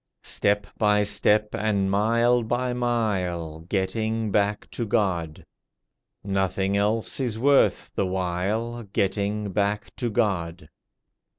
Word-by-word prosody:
Step 100 0 +1
by 105 -1 +3
step 105 +1 +2
and 100 -2 0
mile 115 +4 +3
by 120 +2 -1
mile— 95 -10 -1
Getting 110 +3 -1
back 105 +1 0
to 120 - -3
God; 90 -8 -1 0.8
Nothing 95 0 0
else 105 +5 0
is 120 -5 -1
worth 140 +4 +3
the 95 - 0
while— 95 +6 -2
Getting 100 0 -1
back 100 +2 -1
to 120 - -1
God. 90 -8 -1
105 Hz, 110 wpm, -25 LUFS, 95-115 Hz, 0.8 s, by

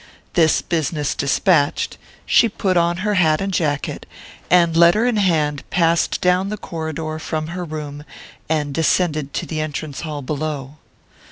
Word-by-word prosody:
This 160 -3 +3
business 155 -3 -1
despatched, 145 +1 +1 0.3
she 230 - +4
put 190 -2 -1
on 170 0 +2
her 210 - +1
hat 160 -5 +3
and 195 0 -2
jacket, 150 -5 -2 0.4
and 170 -2 +4
letter 170 +7 +5
in 245 -3 +1
hand 155 -7 +1
passed 170 -1 +2
down 180 +2 +2
the 210 - -4
corridor 160 -3 -5
from 155 0 -3
her 180 +1 -4
room, 150 -3 -6 0.5
and 150 -3 0
descended 155 -2 +1
to - - -2
the 155 -1 -3
entrance 155 -1 -5
hall 150 -3 -5
below. 145 0 -4
160 Hz, 150 wpm, -20 LUFS, 150-180 Hz, 0.5 s, letter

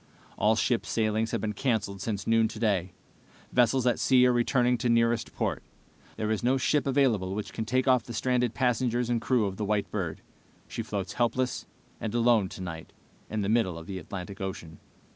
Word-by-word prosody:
"All 110 +1 +3
ship 115 +1 +1
sailings 110 0 0
have - - -2
been 105 -1 -2
canceled 105 -5 -1
since 100 -2 -3
noon 115 0 +3
today. 100 -6 -1 0.6
Vessels 125 +1 +3
at 125 - +2
sea 125 -1 +5
are 125 - +4
returning 125 +1 +2
to 120 - 0
nearest 115 0 +2
port. - - -1 0.6
There 110 0 -1
is 110 - 0
no 130 +3 +2
ship 140 +2 +1
available 120 -9 +2
which 105 - -5
can 110 - -3
take 130 +3 0
off 130 -2 +5
the 120 - -7
stranded 125 0 0
passengers 125 -1 +1
and 115 -2 +1
crew 125 -5 +2
of 95 -1 -4
the 105 - -2
White 105 0 -1
Bird. 85 -6 -3 0.5
She - - -4
floats 95 -3 -4
helpless 125 +1 -1 0.3
and 110 0 -4
alone 115 -5 +3
tonight 80 -4 -7 0.4
in 110 0 -2
the 100 - -1
middle 105 -6 +1
of 80 - -9
the 95 0 -5
Atlantic 95 +3 -7
Ocean. 85 -5 -6
110 Hz, 190 wpm, -28 LUFS, 100-125 Hz, 0.6 s, sea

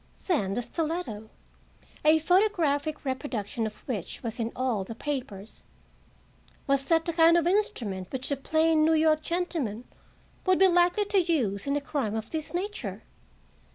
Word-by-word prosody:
Then 200 - 0
the 245 - -1
stiletto—a 310 0 -3
photographic 315 -5 +1
reproduction 240 -5 -3
of 215 - -12
which 215 - -5
was 230 0 -4
in 230 0 -1
all 250 -6 0
the 225 +4 -8
papers—was 245 -7 -6 1.2
that 325 +2 +2
the 335 - -1
kind 330 +1 +6
of 335 - +1
instrument 260 - 0
which 260 +1 -4
a - - +2
plain 315 +3 +2
New 320 +1 +4
York 310 -1 +3
gentleman 315 - -2 0.6
would 370 -1 +5
be 385 - +6
likely 355 +3 +3
to 400 -1 +2
use 265 - 0
In 280 - +1
a 290 - 0
crime 270 -7 -2
of 220 0 -5
this 315 -2 -3
nature? 345 - -4
295 Hz, 150 wpm, -27 LUFS, 225-335 Hz, 1.2 s, kind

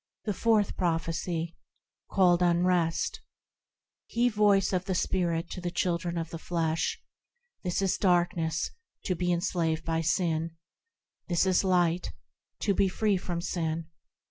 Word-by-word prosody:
The 210 - 0
Fourth 215 0 +2
Prophecy, 165 -1 -1 0.5
called 180 -2 +4
Unrest 175 -1 +2 0.9
HE 240 +1 +2
voice 205 -3 +3
of 185 0 0
the 190 -2 -1
Spirit 170 -2 0
to 180 - -5
the 175 - -2
children 175 -1 -1
of 165 -1 -3
the 165 - -5
flesh,– 165 -1 -1 0.6
This 180 +1 -1
is 190 - +1
darkness,–to 175 - 0
be 180 0 0
enslaved 170 -2 0
by 165 0 0
sin; 165 -1 0 0.7
This 175 +1 +2
is 185 0 +3
light,–to 180 +2 -1
be 195 +1 +3
free 205 +1 +1
from 175 -2 -3
sin. 165 -2 -2
175 Hz, 125 wpm, -29 LUFS, 165-185 Hz, 0.9 s, called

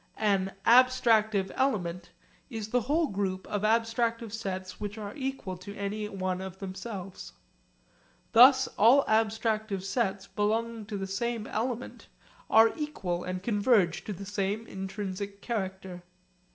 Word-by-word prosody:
An 195 -3 +1
'abstractive 230 -5 +4
element' 180 -10 -1 0.4
is 220 -4 -5
the 245 +2 +2
whole 300 +8 +1
group 195 -6 -2
of 205 - -3
abstractive 230 +1 +1
sets 185 -4 -5
which 205 0 -5
are 205 -1 -6
equal 265 -9 -4
to 200 +3 -9
any 210 +1 -3
one 185 -2 -3
of 190 -1 -7
themselves. 195 0 -7 1.0
Thus 260 +3 +8
all 245 +7 +6
abstractive 220 -2 0
sets 195 -1 -1
belonging 220 +1 -1
to 210 -2 -4
the 195 - -3
same 220 +3 -2
element 240 +3 -4 0.4
are 225 +1 +6
equal 195 - -3
and 185 0 -4
converge 205 -4 +2
to 210 - -4
the 200 +2 -8
same 205 +2 -2
intrinsic 195 0 -5
character. 190 -5 -4
210 Hz, 130 wpm, -29 LUFS, 190-230 Hz, 1.0 s, Thus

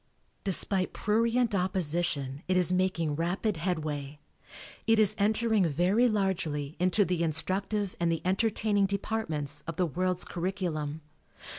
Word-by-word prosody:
Despite 190 0 0
prurient 230 +2 +1
opposition 170 -7 0
it 185 0 +2
is 180 0 +3
making 180 -5 0
rapid 180 +5 -1
headway. 150 -4 -3 0.7
It 225 0 +5
is 215 -1 +5
entering 215 -1 +2
very 180 - +2
largely 170 -8 -1
into 185 +3 +3
the 180 -2 -1
instructive 190 +5 -1
and 170 -1 +1
the 165 - -2
entertaining 205 +1 +1
departments 195 -8 -2
of 165 - -4
the 180 - +1
world's 180 +3 0
curriculum. 170 -5 -3
185 Hz, 125 wpm, -29 LUFS, 160-205 Hz, 0.7 s, It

